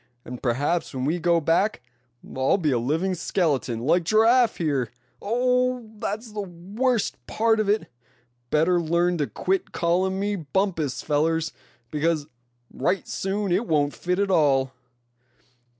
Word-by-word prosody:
And 125 0 -8
perhaps, 140 +6 -1
when 130 0 -2
we 165 +5 0
go 170 0 +3
back, 165 - +1 0.5
I'll 130 +7 +2
be 155 -6 0
a 125 - +2
living 160 +10 0
skeleton, 150 - -1
like 170 +7 +2
Giraffe 225 +5 +4
here. 140 -8 0 0.3
Oh! 250 +2 +1
that's 215 +3 -4
the 210 0 -4
worst 200 +7 -1
of 220 -2 +2
it. 210 +1 +2 0.6
Better 170 +3 +3
learn 170 +1 +1
to 145 - 0
quit 190 0 -1
callin' 185 +3 +1
me 205 0 -1
Bumpus, 160 -3 -1
fellers, 160 +2 +1 0.4
because 155 0 0 0.5
right 185 +9 -1
soon 195 0 -2
it 200 +6 +1
won't 145 -2 +1
fit 180 0 -2
at 200 -1 +1
all." 135 -6 +3
175 Hz, 135 wpm, -24 LUFS, 150-200 Hz, 0.6 s, Giraffe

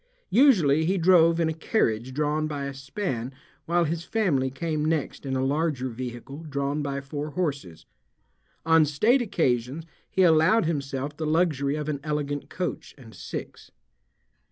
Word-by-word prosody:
Usually 175 - +5
he 190 +4 +1
drove 170 -1 +5
in 165 - +2
a 160 - -1
carriage 130 - 0
drawn 150 +2 0
by 145 -2 -4
a 140 - -4
span 135 - -4 0.4
while 170 +1 +2
his 165 +1 -2
family 170 -10 0
came 155 +3 -2
next 155 -2 -2
in 135 - -1
a 130 0 0
larger 140 -2 0
vehicle 125 +3 -7
drawn 140 +1 -1
by 140 -1 -3
four 145 +2 -5
horses. 140 - -4 0.8
On 160 0 +5
state 215 - +3
occasions 150 - -1 0.2
he 190 - +2
allowed 165 +5 +4
himself 140 -2 -3
the 155 0 -3
luxury 150 -4 +1
of 150 -1 -4
an 150 -2 -2
elegant 145 -2 -3
coach 180 -2 -5
and 115 -5 -14
six. - - -8
150 Hz, 155 wpm, -26 LUFS, 135-165 Hz, 0.8 s, Usually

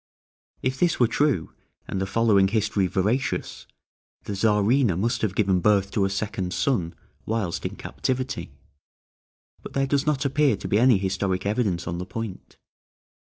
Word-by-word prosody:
If 130 +1 -1
this 175 -1 +2
were 120 - +6
true, 130 - 0 0.3
and 95 - -3
the 95 - -1
following 100 -2 +3
history 105 -2 +1
veracious, 105 +9 -1 0.6
the 105 - -5
Czarina 105 +1 +2
must 115 +5 0
have 100 -4 -1
given 95 -3 +2
birth 100 +1 +2
to 100 - +1
a - - 0
second 95 -2 -3
son 95 -12 0 0.3
whilst 105 -6 -1
in - - -9
captivity; 130 - -3 1.1
but - - -10
there 135 0 +1
does 140 +2 0
not 145 -2 +1
appear 140 -3 +3
to - - -6
be 105 - +2
any 125 -2 +5
historic 95 0 -1
evidence 100 -4 0
on 85 +1 -3
the 90 - -5
point. 110 -2 -7
105 Hz, 155 wpm, -25 LUFS, 95-125 Hz, 1.1 s, were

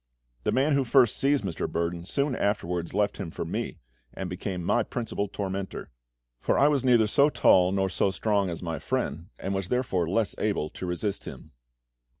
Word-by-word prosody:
The - - +2
man 140 +3 +2
who 140 -1 +3
first 125 -2 +4
seized 140 -1 +2
Mr. 95 -4 -3
Burdon 85 0 -2
soon 140 +1 0
afterwards 90 -5 -1
left 105 0 +1
him 95 -5 -4
for - - -5
me, - - -3 0.4
and 95 -2 -5
became 90 -1 -4
my 120 - +2
principal 110 -3 -3
tormentor; 95 -1 -4 0.5
for - - +1
I 145 - +5
was 140 -3 +1
neither 120 -4 +5
so 140 +7 +4
tall 90 -10 +4
nor 95 0 +1
so 95 +1 +1
strong 100 0 0
as 85 0 -5
my 80 -3 -3
friend, 85 +5 -2
and 95 - -3
was 95 -2 -2
therefore 95 -9 0
less 110 +3 +1
able 100 -8 -1
to 90 - -6
resist 95 +3 -2
him. 75 - -9
100 Hz, 185 wpm, -27 LUFS, 90-120 Hz, 0.5 s, I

